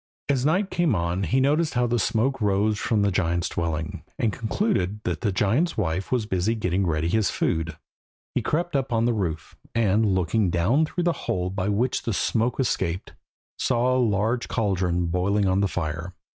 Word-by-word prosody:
As 135 -3 +2
night 190 +5 +1
came 170 -9 +2
on 85 +1 -1
he 130 - +2
noticed 150 +4 +2
how 125 0 +3
the 120 0 +1
smoke 120 +6 0
rose 105 +1 +1
from 105 -3 +1
the 100 - +2
giant's 85 -2 0
dwelling, 85 +1 -3 0.2
and 110 -4 0
concluded 110 - -1
that - - -2
the 105 - +1
giant's 115 - +1
wife 95 -2 -1
was 125 -4 +1
busy 100 +3 0
getting 95 -3 0
ready 80 0 0
his 105 +1 +2
food. 80 -1 -1 0.6
He - - 0
crept 170 +1 -1
up 135 -2 0
on 115 -1 +2
to 120 - +3
the - - 0
roof, 85 -7 -3 0.2
and, 110 -1 +3
looking 95 +2 +1
down 105 - +2
through 175 +2 -2
the 175 -1 +2 0.2
hole 90 0 0
by 95 0 -2
which 115 +5 0
the 115 - -2
smoke 115 +5 0
escaped, 95 -8 -1 0.5
saw 125 +1 +2
a - - +2
large 110 +2 +1
caldron 90 -5 0
boiling 95 +4 +1
on 95 +1 +2
the 100 - +3
fire. 85 +1 -4
105 Hz, 190 wpm, -25 LUFS, 90-120 Hz, 0.6 s, how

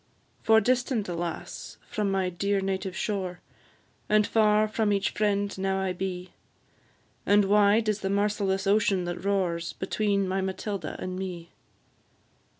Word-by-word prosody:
For 220 0 +5
distant, 245 -1 0
alas! 170 -1 -5
from 210 -2 -1
my 190 -1 0
dear 200 +3 0
native 190 -1 -3
shore, 185 -4 -2 0.7
And 210 0 +4
far 215 -1 +3
from 215 0 0
each 200 -1 +1
friend 205 -1 0
now 195 0 0
I 190 -1 -1
be; 180 0 -5 0.9
And 205 0 +4
wide 210 +2 +4
is 215 -1 +1
the 195 - -2
merciless 200 -1 0
ocean 200 -2 +2
that 175 +1 -5
roars 185 -4 0
Between 200 0 0
my 190 +1 0
Matilda 190 +1 -4
and 185 0 -5
me. 175 -3 -6
200 Hz, 140 wpm, -27 LUFS, 190-210 Hz, 0.9 s, For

